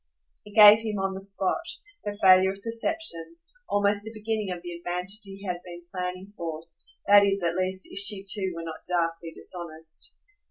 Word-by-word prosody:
It 210 - -13
gave 210 0 +10
him 220 -2 -3
on 195 0 -1
the 190 - -7
spot, 195 - -1 0.4
her 205 - -3
failure 190 0 +7
of 195 0 -15
perception, 230 - -3 0.3
almost 205 +1 +3
a - - -4
beginning 215 -2 -3
of 180 -1 -5
the 175 - -6
advantage 180 +4 -3
he 195 0 -7
had 180 -2 -3
been 175 -1 -10
planning 185 +1 -5
for 165 -3 -5 0.4
that 205 0 +7
is 200 -1 +1
at 170 -1 +1
least 185 +1 -1
if - - -4
she 200 -1 +1
too 195 -1 +2
were 165 - -6
not 165 -1 -8
darkly 165 -1 -1
dishonest. 160 -2 -6
190 Hz, 185 wpm, -26 LUFS, 175-205 Hz, 0.4 s, gave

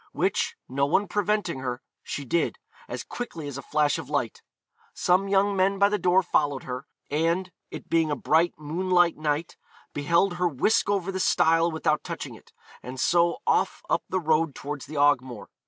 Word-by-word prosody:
which, - - 0
no 140 +2 0
one 195 +7 +2
preventing 205 -6 0
her, 125 -1 -3 0.2
she 145 - -5
did, 170 +6 0 0.3
as - - -5
quickly 170 -11 -6
as 140 - -6
a 140 - -5
flash 150 +2 +1
of 145 -4 -8
light. 140 -6 -2 0.5
Some 185 +2 +2
young 200 +1 +2
men 195 +1 +2
by 200 +1 +4
the 210 0 0
door 180 +2 +3
followed 145 -5 0
her, 125 +2 -6 0.2
and, 170 +5 0 0.2
it - - -9
being 165 -1 +2
a 145 - 0
bright 165 +4 +2
moonlight 175 +3 +2
night, 155 +1 -2 0.4
beheld 170 +5 +1
her 180 0 +2
whisk 175 - +1
over 195 -2 0
the 190 - -3
stile 165 -2 +3
without 160 -1 0
touching - - -6
it, - - -16 0.3
and 125 +2 -8
so 170 - +3
off - - +1
up - - +2
the 185 - 0
road 160 -2 +1
towards 145 -1 -6
the 155 - -7
Ogmore. 130 -5 +1
165 Hz, 180 wpm, -26 LUFS, 145-185 Hz, 0.5 s, by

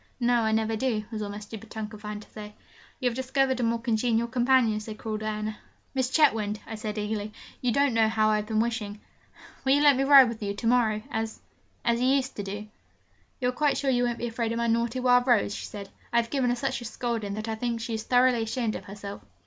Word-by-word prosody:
'No, 240 -1 +3
I 220 -1 +1
never 220 0 +1
do,' 220 -2 0
was 220 -1 -4
all 205 - -3
my 205 - -6
stupid 215 +1 -9
tongue 220 -2 -5
could 215 -1 -12
find 210 0 -5
to - - -21
say. 210 -1 -9 0.4
'You 255 - +1
have 240 - -1
discovered 260 0 +1
a - - 0
more 230 0 +1
congenial 230 0 +1
companion,' 245 -3 +3
said 215 0 -8
cruel 215 -1 -4
Diana. 215 0 -3 0.4
'Miss 260 -2 0
Chetwynd,' 225 -8 +2
I - - -7
said 215 0 -5
eagerly, 210 0 -3 0.3
'you 250 - +1
don't 280 0 +2
know 225 -1 +4
how 215 -1 +2
I 215 - +3
have 210 0 -3
been 215 -1 0
wishing! 220 -3 -2 0.6
Will 265 - +4
you 290 - +3
let 290 -2 +7
me 270 - +1
ride 275 -2 +8
with 230 -1 -5
you 200 -1 -2
to 230 - -6
morrow, 225 -3 +2
as 220 0 -3 0.5
as 235 0 +2
you 250 - +3
used 270 0 +1
to - - -2
do?' 205 +2 -6 0.7
'You 250 - +1
are - - 0
quite 290 +3 +1
sure 275 -2 +1
you 245 -1 +2
won't 240 -1 -1
be - - -3
afraid 230 -1 -2
of 230 - -2
my 235 - 0
naughty 235 +2 +1
Wild 245 0 +4
Rose?' 220 -4 +3
she - - -5
said. 200 -2 -8 0.2
'I 235 - +2
have 230 - -10
given 265 -3 +1
her 245 - +2
such 260 -1 -2
a - - -7
scolding, 225 -3 -3
that 215 +1 -5
I 225 - -1
think 235 +1 -2
she 230 0 -4
is 220 - -2
thoroughly 250 0 +3
ashamed 225 0 -1
of - - -7
herself.' 200 0 -8
230 Hz, 255 wpm, -27 LUFS, 215-250 Hz, 0.7 s, ride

